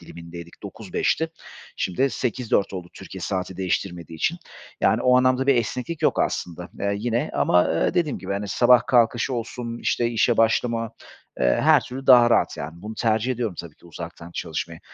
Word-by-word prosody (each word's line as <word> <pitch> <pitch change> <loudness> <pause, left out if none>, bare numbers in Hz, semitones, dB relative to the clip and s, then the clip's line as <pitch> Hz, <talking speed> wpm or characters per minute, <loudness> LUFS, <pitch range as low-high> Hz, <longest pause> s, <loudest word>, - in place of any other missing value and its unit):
dilimindeydik, 85 0 -11
9-5'ti. 160 0 -2 0.5
Şimdi 130 +9 0
8-4 120 -5 -1
oldu, 90 -2 -6
Türkiye - - -10
saati 95 -1 -3
değiştirmediği 90 -3 -3
için. 170 - -1 0.4
Yani - - +2
o 125 0 +5
anlamda 130 +1 +2
bir 140 - +5
esneklik 125 +7 -2
yok - - +2
aslında, 90 +1 -3
eee, 100 0 0
yine 115 +2 -1
ama, 90 0 +3
eee, 80 - 0
dediğim 160 -6 0
gibi, - - -5
hani, 100 0 -3
sabah 120 +2 +4
kalkışı 120 +1 +2
olsun, 120 0 -5
işte, 120 - 0
işe 120 0 +2
başlama, 115 0 +1 0.5
eee, - - +2 0.2
her - - +5
türlü 135 +2 -8
daha 120 -2 +7
rahat, - - +2
yani 80 +5 -7
bunu 110 +1 -6
tercih 115 +3 +1
ediyorum 115 -6 -3
tabii 85 -3 -12
ki - - -20
uzaktan 85 +1 -9
çalışmayı. 80 0 -5
115 Hz, 170 wpm, -23 LUFS, 90-125 Hz, 0.5 s, daha